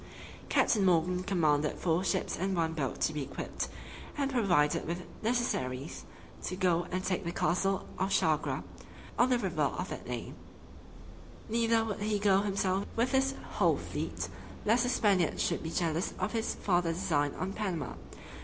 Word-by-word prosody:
Captain 210 -4 +3
Morgan 180 0 +3
commanded 155 -6 +1
four 175 +1 +1
ships 190 -1 0
and 190 +1 -1
one 165 -1 +1
boat 140 -6 -2
to 155 - +2
be 150 - -2
equipped, 135 - -4 0.5
and 280 -1 0
provided 175 - +2
with 175 +2 -3 0.2
necessaries, 170 - -1 0.4
to 185 - -3
go 175 -2 +2
and 185 +1 -2
take 185 0 -1
the 170 - -2
castle 190 +3 +1
of 190 - +1
Chagre, 160 -5 +1 0.6
on 245 - +5
the 250 - +4
river - - -2
of - - 0
that - - -6
name; - - -4 1.2
neither 230 0 +3
would 215 -3 -3
he 210 0 0
go 200 -1 +4
himself 195 -1 0
with 235 +2 +1
his 270 0 +2 0.2
whole - - +4
fleet, - - -4 0.4
lest 225 +3 +4
the 245 - +1
Spaniards 195 -9 +2
should - - 0
be 160 - -4
jealous 165 0 -1
of - - -1
his 225 -1 -1
farther 175 -3 +1
design 145 -4 0
on 190 +1 -3
Panama. 180 - -2
185 Hz, 165 wpm, -31 LUFS, 165-215 Hz, 1.2 s, on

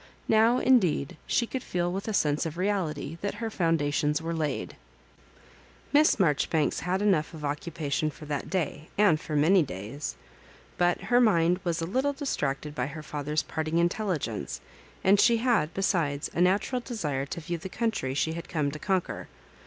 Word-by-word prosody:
Now, 225 +3 +5
in 260 0 +5
deed, 155 -7 -1
she 235 - +2
could 255 +2 -4
feel 175 -4 -1
with 195 +3 -4
a - - -1
sense 150 -2 +1
of 160 +1 -7
reality 170 -5 -2
that 200 - -2
her 225 -1 -4
foundations 150 -4 +1
were 165 +1 -3
laid. 155 -4 -2 1.2
Miss 300 -5 +5
Marjoribanks 155 -2 +2
had 185 +3 -1
enough 175 -6 +2
of 150 -2 -6
occupation 155 -1 -2
for 150 +1 -11
that 145 -1 -3
day, 160 -4 -2
and 190 -7 +4
for 155 - -4
many 170 +6 +5
days. 110 - -5 0.6
But 175 0 +2
her 245 0 +3
mmd 180 -5 +3
was 170 -1 -1
a - - 0
little 260 +10 0
distracted 150 - -2
by 125 -3 -2
her 155 +2 -8
father's 150 +1 -2
parting 160 +1 -2
intelligence, 170 - -1 0.4
and 195 +1 +5
she 235 +1 +5
had, 225 -10 +2
besides, 165 -7 0
a - - -3
natur^ 205 +7 +2
desire 150 - -3
to 170 - -5
view 170 +1 -4
the 190 +3 -7
country 220 - -1
she 160 +3 0
had 170 0 -7
come 150 -4 0
to 155 - -7
conquer. 185 +1 -1
165 Hz, 175 wpm, -28 LUFS, 150-200 Hz, 1.2 s, Now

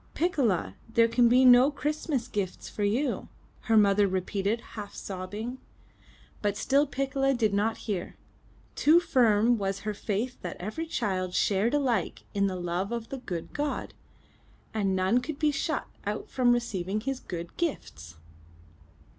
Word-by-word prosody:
'Ticcola, 235 - +1 0.2
there 230 0 +5
can 235 +1 +4
be 255 +2 +5
no 250 +2 +8
Christmas 295 -3 -2
gifts 200 -6 -4
for 210 - -4
you!" 230 +8 0 0.4
her 225 - +4
mother 205 -1 +5
repeated 195 +4 -1
half 205 -2 -7
sobbing. 205 +7 -5 0.8
But 205 -1 0
still 280 +5 +2
Piccola 270 0 0
did 220 -4 +1
not 220 +3 +1
hear. 200 -6 -3 0.6
Too 315 +4 +5
firm 235 -7 +3
was 195 0 -2
her 215 +1 -3
faith 220 +5 -3
that 180 - -5
every 215 - -4
child 185 - -2
shared 210 +6 +2
alike 265 -5 0
in 200 -1 +2
the 190 - -2
love 180 +3 -2
of 235 -1 -4
the 270 - -5
good 175 -9 -6
God, 290 0 -3 0.8
and 200 -3 0
none 190 +6 +3
could 280 +4 -5
be 305 0 +2
shut 300 +1 -2 0.2
out 210 +1 -4
from 250 -2 +3
receiving 215 -4 -1
His 270 +2 -3
good 170 -6 -7
gifts. 80 - -4
220 Hz, 150 wpm, -28 LUFS, 195-260 Hz, 0.8 s, no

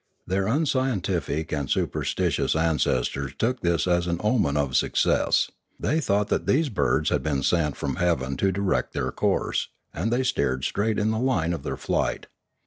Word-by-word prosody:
Their 95 +1 0
unscientific 105 - 0
and 75 -3 -2
superstitious - - 0
ancestors 70 -4 0
took 125 +2 0
this 85 -4 +1
as 90 -1 +1
an 85 -1 -1
omen 105 - +2
of 70 -3 0
suc - - +1
cess; - - +2 0.3
they 155 - +1
thought 105 -5 +1
that - - -1
these 150 +2 +3
birds 70 - +1
had - - +1
been 70 -3 -1
sent 75 -1 +1
from 70 -2 -3
heaven 70 -7 0
to 95 - +2
direct 95 -1 -1
their - - -2
course, - - 0 0.3
and 100 +8 -2
they 125 +2 +2
steered 65 - 0
straight 110 +1 0
in 105 +1 +1
the 110 - -1
line 115 -10 +1
of 85 - -4
their - - -4
flight. - - -1
90 Hz, 175 wpm, -25 LUFS, 75-110 Hz, 0.3 s, these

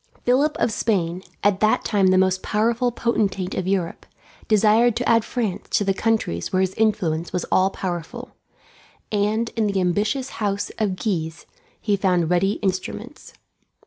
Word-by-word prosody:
Philip 275 +5 +2
of - - +1
Spain, 185 -6 -1 0.2
at 200 -1 +3
that 215 0 +2
time 200 -3 +2
the 185 0 +4
most 185 0 +2
powerful 235 +3 +1
potentate 200 -6 -1
of 185 - -3
Europe, 190 -3 -2 0.4
desired 220 +2 +4
to 245 - -1
add 230 -1 +4
France 220 -7 -3
to - - +1
the 195 -1 +1
countries 200 - -1
where 185 - +2
his 190 0 0
influence 190 -7 0
was 180 - -2
all 185 +1 +4
powerful; 190 +7 -5 0.8
and 215 +2 0
in 220 -2 +1
the 200 -1 0
ambitious 205 +9 0
house 200 -1 -1
of 205 -4 0
Guise 165 -5 -3 0.3
he 205 -2 +1
found 180 -4 +1
ready 190 +3 +2
instruments. 200 +8 -4
200 Hz, 155 wpm, -22 LUFS, 185-225 Hz, 0.8 s, the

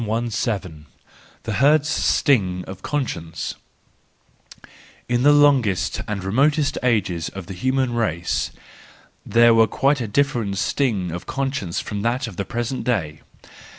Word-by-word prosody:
ii 115 - -3
7* 105 -8 -2 0.6
The 110 - -3
Herd's 150 +1 +4
Sting 95 -13 +1
of 95 0 -9
Conscience 85 - -3 1.5
.—In 120 0 +1
the 145 +3 +6
longest 140 -10 +3
and 105 -3 -3
remotest 140 +9 +1
ages 95 -9 0
of 95 -2 -8
the 95 - -7
human 130 +5 0
race 85 -8 -1 0.7
there 115 0 +5
was 115 0 +5
quite 140 -1 +1
a 115 - -2
different 115 -4 0
sting 100 -7 0
of 85 +1 -7
conscience 135 -10 -2
from 105 -1 -4
that 120 +4 0
of 115 -5 -8
the 100 - -3
present 120 +2 -3
day. 80 -11 -2
115 Hz, 135 wpm, -22 LUFS, 95-130 Hz, 1.5 s, the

